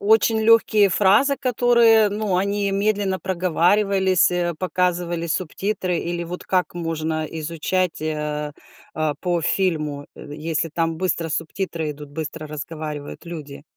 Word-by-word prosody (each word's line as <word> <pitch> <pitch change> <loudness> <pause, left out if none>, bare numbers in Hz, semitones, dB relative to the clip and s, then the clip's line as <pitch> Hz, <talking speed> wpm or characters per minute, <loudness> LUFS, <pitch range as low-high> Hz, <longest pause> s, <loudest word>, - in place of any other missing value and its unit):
очень 220 +1 +3
легкие 220 -2 +5
фразы, 210 +10 +4
которые, 235 -3 +4
ну, 205 -2 -1
они 200 +2 0
медленно 200 -1 0
проговаривались, 185 +1 +2 0.3
показывали 175 -2 -1
субтитры, 185 +2 -2
или 170 0 -3
вот 175 +2 -6
как 185 -2 0
можно 160 -2 -2
изучать, 165 +3 -2
э, 150 -1 -2 0.4
а, 155 -1 0
по 175 -2 0
фильму, 150 -6 -1
э, - - -10
если 160 +1 -2
там 165 0 -1
быстро 170 -2 -1
субтитры 165 0 -3
идут, 145 0 -11
быстро 155 +1 -6
разговаривают 150 0 -6
люди? 150 -4 -8
175 Hz, 120 wpm, -22 LUFS, 155-195 Hz, 0.4 s, легкие